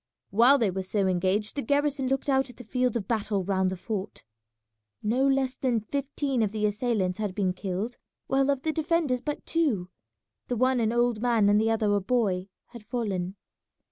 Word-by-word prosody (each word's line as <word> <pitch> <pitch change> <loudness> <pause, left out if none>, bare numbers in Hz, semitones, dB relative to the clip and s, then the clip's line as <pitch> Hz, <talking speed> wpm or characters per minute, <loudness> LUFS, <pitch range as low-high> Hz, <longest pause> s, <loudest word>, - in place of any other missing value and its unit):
While 240 +7 +6
they 225 -7 +1
were 190 +1 -3
so 195 +1 0
engaged 190 +3 0
the 285 - -1
garrison 285 +1 +1
looked 270 +2 -1
out 270 -1 +2
at 245 - -13
the 245 - -9
field 250 +1 0
of 200 -4 -5
battle 210 -4 0
round 190 0 +1
the 185 - -4
fort. 200 +1 -5 0.8
No 250 +6 +2
less 270 -1 +1
than 250 -3 0
fifteen 275 +2 -2
of 210 -3 +1
the 215 -1 -1
assailants 210 -3 0
had 205 -4 -2
been 190 -3 +1
killed, 195 +5 -4 0.3
while 270 +1 +2
of 275 -2 0
the 315 - +1
defenders 310 -5 0
but 295 +2 -4
two, 235 - 0 0.6
the 245 - -2
one 255 +1 +3
an 225 -1 +1
old 240 -2 +1
man 230 -4 +3
and 205 +1 +4
the 225 - +2
other 215 -2 +2
a 205 - +2
boy, 190 -4 0 0.2
had 235 -2 -11
fallen. 195 -6 -3
230 Hz, 195 wpm, -27 LUFS, 200-260 Hz, 0.8 s, While